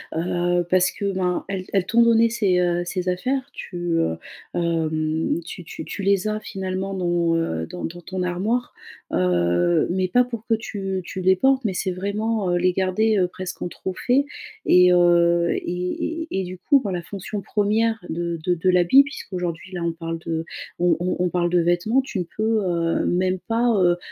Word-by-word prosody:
Heu, 175 +1 0
parce 185 0 +4
que, 200 -1 -3
ben, 180 -2 -1
elles 190 -2 -3
elles 195 -2 +2
t'ont 235 +4 +3
donné 230 0 +5
ces, 200 -6 +1
heu, 175 -1 +1
ces 180 +1 -2
affaires, 260 +9 -1
tu, 180 - -9 0.2
heu, 80 - 0 0.4
hem, 160 -1 0
tu 170 +1 -8
tu - - -7
tu - - -6
les 200 +1 +2
as 215 0 -2
finalement 190 -1 -4
dans, 175 -2 +1
heu, 80 - -1
dans 180 - -8
dans 175 +2 -5
ton 185 +2 -4
armoire, 205 +8 -1 0.4
heu, 85 -1 +2
mais 185 +1 0
pas 245 +7 +4
pour 235 -3 -7
que 230 - +2
tu 195 -4 -3
tu 185 - -6
les 190 +1 +4
portes. 265 +4 +2
Mais 200 - 0
c'est 185 +1 -1
vraiment, 200 +1 -1
heu, - - +2
les 180 +1 +3
garder, 195 +4 +1
heu, 185 -2 +3
presque 185 0 -7
en - - -1
trophée, 245 +10 0 0.4
et 180 0 +6
heu, 170 -1 +4
et 320 - -3
et - - -1
et - - -1
du 185 +1 -7
coup, 280 +9 +3
bah, 200 -5 -3
la 175 - -2
fonction 200 +3 -6
1re 220 +3 +1
de 170 0 -3
de 180 - +3
de 175 +2 0
l'habit, 180 +9 +6
puisqu'aujourd'hui 185 - -5
là 175 -2 -3
on 170 - 0
parle 165 0 -5
de 165 -1 -2 0.3
on 175 -1 +3
on 180 +1 -1
on 180 - +2
parle 175 0 0
de 175 0 +3
vêtements, 175 +9 +2
tu 260 -6 -5
ne - - 0
peux, 220 0 +1
heu, 170 -2 0
même 185 +1 +1
pas, 235 +1 +2
heu, 175 -1 +4
180 Hz, 195 wpm, -23 LUFS, 175-205 Hz, 0.4 s, et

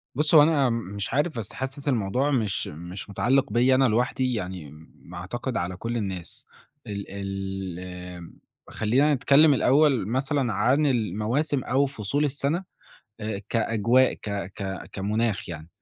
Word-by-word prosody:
بُصّ 150 +3 +2
هو 150 - +10
أنا 145 -5 +3
م - - 0 0.2
مش 100 -2 -4
عارف 145 -1 0
بس 105 - -7
حاسس 135 +2 -6
الموضوع 125 +3 +1
مش 110 -7 0
مش 85 +6 -8
مُتعلِّق 110 +4 +1
بيَّ 125 +2 +4
أنا 130 0 +4
لوحدي، 125 +3 +1
يعني 90 -8 -5
م 80 +1 -15 0.2
ما 90 +1 -10
أعتقد 120 +7 -4
على 90 +1 -2
كلّ 115 +3 -3
الناس. 95 -5 -5 0.4
ال 100 -1 -4
ال 95 -2 -5
آمم 90 -1 -9 0.3
خلّينا 130 +8 +2
نتكلّم 145 +2 +5
الأول 135 -4 +3
مثلًا 130 0 0
عن 130 +9 +2
المواسم 120 - 0
أو 135 +3 +2
فصول 140 +3 -1
السَّنة 145 +5 -1 0.6
آآ 105 -2 -3
كأجواء، 115 +3 +3
ك 105 - -8 0.2
ك 95 -2 -5
كمُناخ 105 +1 -1
يعني 80 -2 -7
115 Hz, 150 wpm, -25 LUFS, 95-135 Hz, 0.6 s, هو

